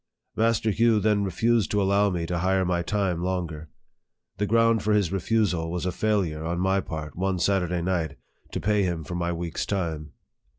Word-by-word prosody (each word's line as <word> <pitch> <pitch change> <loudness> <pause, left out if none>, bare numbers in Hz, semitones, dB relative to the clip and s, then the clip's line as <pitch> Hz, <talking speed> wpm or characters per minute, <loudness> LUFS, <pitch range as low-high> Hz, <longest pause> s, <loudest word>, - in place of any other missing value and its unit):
Master 115 -1 +2
Hugh 115 +1 +3
then 105 0 +2
refused 110 +3 +1
to 105 - +1
allow 100 +1 +3
me 85 -3 -2
to 85 0 -2
hire 95 +1 +1
my 90 -1 0
time 95 -2 -1
longer. 85 -4 -3 0.7
The 105 - +1
ground 115 +1 +3
for 105 +1 +1
his 100 -5 +2
refusal 95 -3 0
was 90 +1 -3
a 90 - 0
failure 95 -8 0
on 85 +2 -2
my 95 +1 +2
part, 80 -3 -6
one 95 +1 -1
Saturday 90 -2 0
night, 85 -6 -1 0.3
to - - -3
pay 105 0 +1
him 85 -4 -1
for 85 - -7
my 85 0 -1
week's 85 -1 -3
time. 80 -6 -3
95 Hz, 185 wpm, -26 LUFS, 85-105 Hz, 0.7 s, Hugh